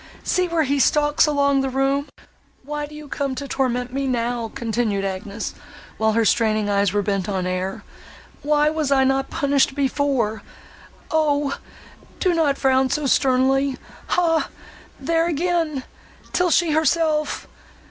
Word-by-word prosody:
—see 365 -1 +1
where 335 -2 +1
he 280 0 0
stalks 295 +3 +3
along 280 -2 +2
the 270 - -1
room! 270 +2 0 0.6
Why 295 +1 -4
do 300 - -12
you 300 -1 -10
come 275 -2 -3
to 280 +1 -5
torment 250 -2 -1
me 275 0 -1
now?" 235 -2 -2
continued 220 -4 -1
Agnes, 200 +3 -4 0.5
while 220 0 +2
her 230 0 +2
straining 215 -2 +2
eyes 200 -1 +2
were 205 0 0
bent 195 -1 -1
on 190 -2 -1
air, 185 +1 -3 0.6
"why 300 +1 +2
was 310 -3 -1
not 265 -1 +4
I - - -25
punished 280 -1 +1
before?—O! 285 +2 -2 0.6
do 365 -2 +2
not 305 -4 +1
frown 265 -1 +2
so 300 +1 -1
sternly! 270 0 +2 0.3
Hah! 330 -2 +2 0.5
there 330 0 +1
again! 330 -4 -1 0.5
'tis 360 -2 +3
she 340 -3 +2
herself! 310 0 +1
275 Hz, 140 wpm, -22 LUFS, 235-300 Hz, 0.6 s, not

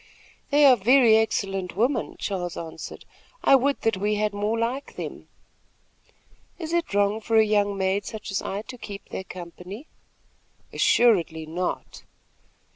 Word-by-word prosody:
"They 290 0 +5
are 265 -2 +8
very 240 +1 +5
excellent 195 -5 0
women," 240 +7 0
Charles 180 -4 -3
answered, 160 -1 -8 0.4
"I - - +7
would 275 +2 +1
that 225 -3 +1
we 205 +2 0
had 210 0 0
more 210 +2 -1
like 240 +5 -3
them." - - -7 1.3
"Is 325 -1 -5
it 340 -11 -1
wrong 205 +2 +2
for 225 +1 -1
a 220 - +6
young 205 -1 +1
maid 190 +1 0
such 215 -2 -7
as 195 - -1
I 200 +2 -4
to 250 +1 -10
keep 200 -3 -9
their - - -5
company?" 180 - -9 0.9
"Assuredly 170 -9 +3
not." 175 +3 -4
210 Hz, 145 wpm, -25 LUFS, 190-235 Hz, 1.3 s, are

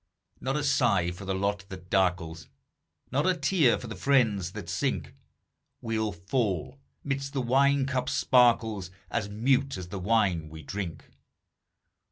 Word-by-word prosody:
Not 135 +2 -1
a 150 - -1
sigh 120 -10 +2
for 95 +3 -9
the 95 0 -1
lot 100 +1 -1
that 90 -1 -10
darkles, 90 -4 0 0.6
Not 145 +6 +1
a 185 - +3
tear 150 -3 +3
for - - -8
the 110 -2 -6
friends 105 -6 +2
that 105 -5 -7
sink; 85 - -2 0.7
We'll 110 -2 -1
fall, 100 - -2 0.2
midst 135 0 -3
the 135 - 0
wine 135 +2 +3
cup's 130 0 -1
sparkles, 115 -8 +3 0.2
As 105 -4 -1
mute 130 +4 +1
as 90 -1 -7
the 95 - -5
wine 95 -6 +1
we 80 0 -10
drink. 95 +1 -5
110 Hz, 150 wpm, -28 LUFS, 95-135 Hz, 0.7 s, a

